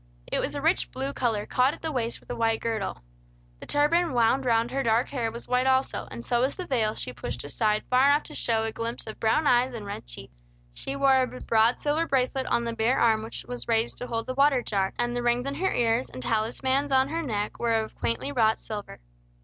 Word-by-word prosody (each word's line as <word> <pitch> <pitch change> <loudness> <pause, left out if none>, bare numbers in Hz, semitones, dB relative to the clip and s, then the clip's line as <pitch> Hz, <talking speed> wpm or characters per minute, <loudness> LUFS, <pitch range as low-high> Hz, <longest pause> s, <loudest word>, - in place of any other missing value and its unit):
It - - -2
was - - -2
a - - -4
rich - - +2
blue 135 - -4
color, 225 - -1
caught 255 +3 +2
at - - -20
the 320 - -1
waist 235 -4 -2
with - - -11
a - - -3
white 225 -1 +1
girdle. 220 - -3 0.6
The - - -11
turban 320 +3 +2
wound 245 +2 +2
around 230 0 +2
her 275 +1 -1
dark 235 0 +2
hair 235 -5 -2
was 235 +1 -9
white 250 +1 +1
also, 260 0 +1
and 115 +1 -8
so 240 0 +1
was 260 +2 0
the 365 - -5
veil 220 -7 0
she 125 - -4
pushed 120 0 -5
aside 210 +9 0
far 255 +2 +4
enough 290 +1 +4
to - - -9
show 225 -2 +1
a 225 - -2
glimpse 230 +1 -4
of 220 - -8
brown 225 +8 +2
eyes 250 -1 +3
and 215 -3 -6
red 200 - -7
cheeks. - - -10 0.4
She 270 - -4
wore 270 -1 +4
a 255 - +1
broad 225 +2 +3
silver 305 +3 0
bracelet 265 0 0
on 235 0 +1
the 230 0 -3
bare 230 +3 +1
arm 220 -2 +3
which 220 +1 -3
was 245 0 -3
raised 230 0 +1
to 250 - -5
hold 230 -1 -2
the 255 - -3
water 275 -2 +3
jar, 195 -2 0
and 240 0 -1
the 245 - -1
rings 240 +1 +1
in 275 - -2
her 370 +7 0
ears 235 +1 +1
and 130 0 -7
talismans 260 - 0
on 265 0 +3
her 330 +2 -2
neck 210 -8 -3
were 235 -1 +1
of 220 -1 -1
quaintly 115 - -2
wrought 225 -5 +3
silver. 210 -2 -7
240 Hz, 240 wpm, -26 LUFS, 220-265 Hz, 0.6 s, far